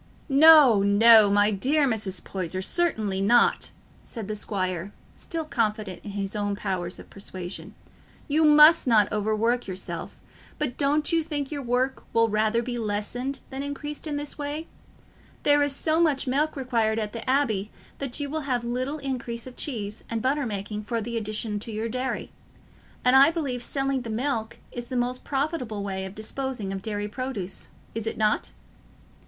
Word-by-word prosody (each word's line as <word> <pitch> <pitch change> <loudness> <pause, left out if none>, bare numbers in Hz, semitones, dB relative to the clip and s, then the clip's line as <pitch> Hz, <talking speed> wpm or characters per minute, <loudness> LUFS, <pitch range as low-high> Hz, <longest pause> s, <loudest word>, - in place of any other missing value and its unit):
"No, 285 -6 +8
no, 210 +1 +7
my 205 +1 +4
dear 275 +9 +2
Mrs. 205 -6 -3
Poyser, 185 0 -4
certainly 215 - 0
not," 235 +4 +3 0.3
said 225 -5 -6
the 215 - -3
squire, 185 -2 -3 0.2
still 325 -2 -4
confident 215 - -2
in - - -7
his 200 0 -3
own 205 -1 -1
powers 185 -3 -3
of - - -12
persuasion, 185 -1 -8 0.5
"you 305 +2 +2
must 300 0 +7
not 215 -4 +4
overwork 220 +3 0
yourself; 185 -1 -5 0.4
but 285 -5 -2
don't 295 +2 +2
you 330 -1 +3
think 295 -3 -3
your 290 -2 -3
work 255 +1 -1
will 230 0 +3
rather 215 +2 +1
be 240 0 -4
lessened 230 +6 -3
than 265 +1 -4
increased 295 +2 -5
in 295 - -2
this 290 +1 -5
way? 295 +2 -3 0.8
There 290 0 +5
is 285 -1 +2
so 315 +3 +1
much 310 -5 +2
milk 285 +4 0
required 230 -5 0
at 215 -2 -3
the 230 +1 -5
Abbey 220 -7 +1 0.3
that 275 -1 -3
you 290 - -2
will 310 +2 -3
have 245 -2 0
little 255 +5 -2
increase 250 -4 -4
of 255 -1 -10
cheese 215 -6 -4
and 230 - -2
butter 270 +3 0
making 210 0 -4
from 230 -1 -2
the 235 +2 -5
addition 215 -1 -2
to 225 - -6
your 220 +1 -3
dairy; 255 +3 -3 0.7
and 250 +1 +5
I 275 +3 +8
believe 285 -7 -2
selling 270 +1 0
the 235 - -7
milk 225 -1 -2
is 240 -1 -6
the 255 - -6
most 250 +1 -1
profitable 270 -7 -2
way 190 -1 -3
of 190 +1 -8
disposing 220 -2 -3
of 195 - -5
dairy 205 0 -3
produce, 210 -4 -3 0.3
is 225 0 -4
it - - -3
not?" 215 -1 +1
235 Hz, 170 wpm, -26 LUFS, 210-275 Hz, 0.8 s, No